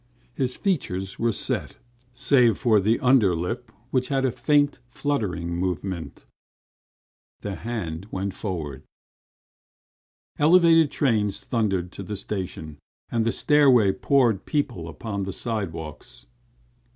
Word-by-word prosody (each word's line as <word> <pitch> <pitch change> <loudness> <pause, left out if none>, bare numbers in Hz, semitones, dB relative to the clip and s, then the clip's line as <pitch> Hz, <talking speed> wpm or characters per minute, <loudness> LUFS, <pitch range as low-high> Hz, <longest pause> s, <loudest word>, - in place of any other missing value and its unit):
His 125 -1 -1
features 95 - -2
were 115 0 +2
set, - - -3 0.3
save 125 -3 +3
for 115 -5 +3
the 110 +4 +2
under 125 - +4
lip, 110 +8 -4 0.2
which 130 -1 +1
had 135 -1 0
a 130 - +2
faint 145 +1 +2
fluttering 95 - -2
movement. 90 -1 -4 1.2
The 100 - -4
hand 100 -7 -5
went 95 -1 -3
forward. 80 -10 -5 1.6
Elevated 165 0 +6
trains 110 -8 0
thundered 95 -7 -1
to - - -8
the 100 +2 -5
station 90 -7 -5 0.3
and 115 -1 +1
the - - +3
stairway 130 -10 +4
poured 120 -2 +2
people 125 - -1
upon 100 +6 -5
the 95 0 -3
side 110 -7 -2
walks. 75 -6 -9
110 Hz, 120 wpm, -25 LUFS, 90-130 Hz, 1.6 s, Elevated